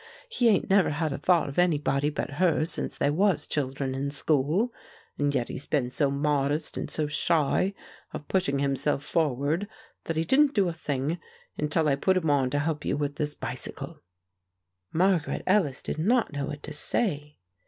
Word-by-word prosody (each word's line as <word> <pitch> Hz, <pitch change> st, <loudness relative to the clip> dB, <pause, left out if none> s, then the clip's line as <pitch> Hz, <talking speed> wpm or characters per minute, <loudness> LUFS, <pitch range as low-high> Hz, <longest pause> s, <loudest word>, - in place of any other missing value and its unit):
He 245 Hz, -, +3 dB
'ain't 205 Hz, -, +2 dB
never 195 Hz, -1 st, +4 dB
had 155 Hz, 0 st, -1 dB
a -, -, -5 dB
thought 175 Hz, +2 st, +3 dB
of 140 Hz, +4 st, -3 dB
anybody 145 Hz, -4 st, +2 dB
but 150 Hz, -, -4 dB
her 170 Hz, -3 st, +3 dB
since 160 Hz, -, -4 dB
they 145 Hz, -, +2 dB
was 175 Hz, -2 st, +2 dB
children 135 Hz, -2 st, -2 dB
in 135 Hz, +1 st, -2 dB
school; 155 Hz, -, +1 dB, 0.5 s
and 145 Hz, 0 st, +1 dB
yet 125 Hz, -2 st, 0 dB
he's 140 Hz, -, -6 dB
been 130 Hz, -5 st, 0 dB
so 140 Hz, +1 st, +1 dB
modest 145 Hz, +1 st, 0 dB
and -, -, -4 dB
so 155 Hz, -, -1 dB
shy 165 Hz, +5 st, +1 dB, 0.4 s
of 150 Hz, -, -7 dB
pushing 160 Hz, -7 st, +1 dB
himself 140 Hz, +1 st, 0 dB
forward 150 Hz, +4 st, 0 dB, 0.4 s
that 165 Hz, -, -2 dB
he 160 Hz, -, +2 dB
didn't 280 Hz, -, +3 dB
do 200 Hz, -3 st, +3 dB
a 170 Hz, -, -2 dB
thing 150 Hz, +1 st, -2 dB, 0.4 s
until 150 Hz, +1 st, +1 dB
I 140 Hz, -2 st, +2 dB
put 185 Hz, +6 st, +2 dB
him 160 Hz, -5 st, +1 dB
on 135 Hz, -3 st, +2 dB
to 145 Hz, -, -1 dB
help 150 Hz, +1 st, -1 dB
you -, -, -1 dB
with 145 Hz, -1 st, -2 dB
this 150 Hz, -1 st, -2 dB
bicycle." -, -, -6 dB, 0.9 s
Margaret 180 Hz, -2 st, +1 dB
Ellis 185 Hz, -9 st, +2 dB
did -, -, -4 dB
not 225 Hz, +1 st, +2 dB
know 140 Hz, -1 st, -2 dB
what 150 Hz, -1 st, -7 dB
to 155 Hz, -, -6 dB
say. 150 Hz, -1 st, -1 dB
150 Hz, 185 wpm, -27 LUFS, 140-175 Hz, 0.9 s, never